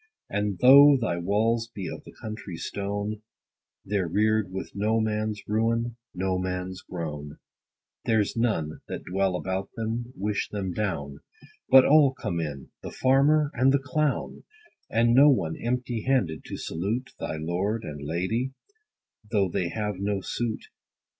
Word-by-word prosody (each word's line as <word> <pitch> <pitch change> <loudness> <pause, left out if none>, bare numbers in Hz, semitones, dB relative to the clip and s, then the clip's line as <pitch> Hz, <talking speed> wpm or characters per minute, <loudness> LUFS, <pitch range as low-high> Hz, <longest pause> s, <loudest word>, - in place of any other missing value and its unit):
And 105 -1 -1
though 140 +2 +9
thy 90 -8 -1
walls 110 +5 +1
be 100 -6 -6
of - - -7
the - - -11
country 105 -5 -7
stone, 100 +3 -3 0.6
They're 100 -3 0
rear'd 110 +2 +1
with 95 - -5
no 110 +3 +1
man's 110 -1 -1
ruin, 115 +2 0 0.2
no 95 0 0
man's 90 0 -3
groan; 75 -4 -6 0.7
There's 110 -3 +1
none, 105 -10 -1
that - - -5
dwell 95 0 0
about 95 +1 -3
them, 115 +2 -3
wish 105 +1 -1
them 95 -3 -3
down; 75 -9 -3 0.5
But 130 0 +8
all 140 -3 +5
come 85 -8 -3
in, 75 -4 -5
the - - -6
farmer 145 +3 +3
and 130 +3 +4
the 140 - +4
clown; 140 +2 -1 0.5
And 115 +1 +3
no 140 +4 +8
one 85 - +1
empty 120 -1 -1
handed, 105 - 0
to - - -6
salute 105 +10 -3
Thy 80 - -3
lord 95 +8 -1
and 75 -1 -7
lady, 95 - -1 0.8
though 100 -4 +2
they 85 0 -1
have 105 -2 -3
no 100 0 -1
suit. 115 +3 -3
105 Hz, 145 wpm, -26 LUFS, 90-120 Hz, 0.8 s, though